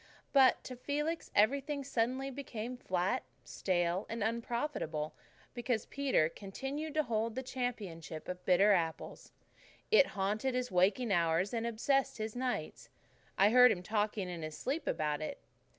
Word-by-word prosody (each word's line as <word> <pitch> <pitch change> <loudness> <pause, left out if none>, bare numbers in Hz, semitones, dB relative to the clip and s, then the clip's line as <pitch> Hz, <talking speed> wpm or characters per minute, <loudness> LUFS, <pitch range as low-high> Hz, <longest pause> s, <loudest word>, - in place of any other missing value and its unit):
But 270 -2 +5
to 255 - -7
Felix 295 +6 -2
everything 280 +6 +2
suddenly 260 +1 -1
became 250 -3 -5
flat, 190 +1 -1 0.2
stale, 175 0 -1
and 225 -2 -2
unprofitable, 230 - -2 0.4
because 240 -2 -1
Peter 270 - +2
continued 270 - -5
to 310 - +3
hold 225 -2 -1
the 260 - -3
championship 205 -12 -5
of 180 0 -5
bitter 195 +3 +5
apples. 165 -4 -1 0.6
It 435 -11 +7
haunted 215 +7 0
his 250 -1 -1
waking 200 +6 +2
hours 170 +2 +2
and 230 0 -1
obsessed 270 +4 +1
his 220 0 -4
nights. 250 0 -3 0.5
I 200 +2 +5
heard 250 0 +8
him 180 -4 -2
talking 210 -1 -1
in 175 -2 -5
his 155 -1 -6
sleep 290 +3 -3
about 150 -1 0
it. 155 - -4
225 Hz, 145 wpm, -33 LUFS, 185-260 Hz, 0.6 s, heard